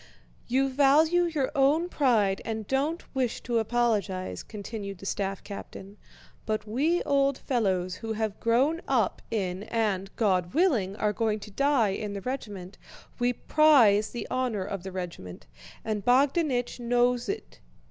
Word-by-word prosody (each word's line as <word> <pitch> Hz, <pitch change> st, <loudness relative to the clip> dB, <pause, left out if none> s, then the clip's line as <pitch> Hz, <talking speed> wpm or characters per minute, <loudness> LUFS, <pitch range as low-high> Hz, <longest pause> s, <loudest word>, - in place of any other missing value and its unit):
"You 265 Hz, +3 st, +2 dB
value 295 Hz, +6 st, +4 dB
your 305 Hz, -6 st, -1 dB
own 290 Hz, +5 st, +3 dB
pride 225 Hz, -, +2 dB
and 220 Hz, -1 st, -4 dB
don't 285 Hz, -, -1 dB
wish 255 Hz, -4 st, -1 dB
to 235 Hz, -1 st, 0 dB
apologize," 210 Hz, -, -1 dB
continued 205 Hz, -2 st, -7 dB
the 195 Hz, -, -12 dB
staff 195 Hz, -1 st, -3 dB
captain, 200 Hz, 0 st, -9 dB, 0.5 s
"but 215 Hz, 0 st, -2 dB
we 295 Hz, +11 st, +1 dB
old 275 Hz, -1 st, +2 dB
fellows, 190 Hz, -8 st, -1 dB
who 225 Hz, -1 st, -4 dB
have 220 Hz, -2 st, -3 dB
grown 270 Hz, +9 st, +2 dB
up 240 Hz, -7 st, +1 dB
in 190 Hz, -4 st, -2 dB
and, 210 Hz, -5 st, -1 dB
God 185 Hz, -2 st, +1 dB
willing, 245 Hz, -, +2 dB
are 210 Hz, 0 st, 0 dB
going 220 Hz, -1 st, 0 dB
to 210 Hz, -, -10 dB
die 275 Hz, -2 st, +2 dB
in 200 Hz, +1 st, -4 dB
the 200 Hz, -, -5 dB
regiment, 205 Hz, -7 st, -6 dB, 0.4 s
we 245 Hz, 0 st, +2 dB
prize 240 Hz, -7 st, +4 dB
the 240 Hz, -, -5 dB
honor 250 Hz, -6 st, -1 dB
of 195 Hz, -1 st, -5 dB
the 190 Hz, +1 st, -7 dB
regiment, 175 Hz, -, -7 dB, 0.4 s
and 215 Hz, -2 st, -2 dB
Bogdánich 260 Hz, -, +2 dB
knows 245 Hz, +2 st, +1 dB
it. 415 Hz, +2 st, -5 dB
230 Hz, 145 wpm, -27 LUFS, 200-270 Hz, 0.5 s, value